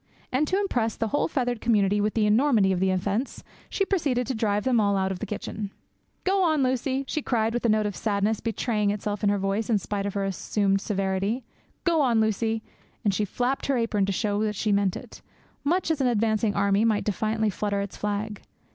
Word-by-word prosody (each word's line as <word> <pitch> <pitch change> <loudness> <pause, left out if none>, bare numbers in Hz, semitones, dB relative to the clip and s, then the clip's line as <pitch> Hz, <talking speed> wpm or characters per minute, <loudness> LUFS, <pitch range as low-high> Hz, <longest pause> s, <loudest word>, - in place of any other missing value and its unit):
And 280 +4 +1
to 375 - +1
impress 240 - 0
the 225 - -2
whole 290 - +1
feathered 245 -6 -1
community 205 -3 +2
with 210 +1 0
the 220 -2 +3
enormity 215 -2 +4
of 185 - 0
the 190 +1 +2
offence, 200 +7 -1 0.3
she 390 - 0
proceeded 285 -11 0
to 265 - -2
drive 210 -3 0
them 250 -3 +3
all 200 -2 +2
out 190 0 0
of 185 - -4
the 220 - -4
kitchen. 210 0 -5 0.5
'Go 385 +1 +2
on, 315 -6 +3
Lucie,' 260 +1 0
she 305 - -2
cried, 230 -3 0
a 235 - +2
note 215 0 +3
of 205 -2 -2
sadness 210 0 0
betraying 220 -2 0
itself 205 0 -2
in 205 - +4
her 205 - +2
voice 195 +3 -1
in 220 - +4
spite 200 0 -3
of 200 - -5
her 200 - 0
assumed 195 +1 0
severity. 195 +4 -1 0.4
'Go 335 -3 +3
on, 240 -5 +3
Lucie,' 220 +1 0 0.4
and 200 - +3
she 210 +2 0
flapped 250 +6 -1
her 275 -2 +2
apron 215 -4 +1
to - - 0
show 205 +1 0
that 215 -1 0
she 210 +1 0
meant 200 -2 +2
it, - - -11 0.4
much 335 +3 +1
as 305 -3 0
an 260 - +3
advancing 220 -2 +1
army 200 +1 +2
might 220 -2 +2
defiantly 215 +1 0
flutter 200 +1 -1
its 200 -1 -4
flag. 210 0 -3
215 Hz, 215 wpm, -26 LUFS, 200-245 Hz, 0.5 s, enormity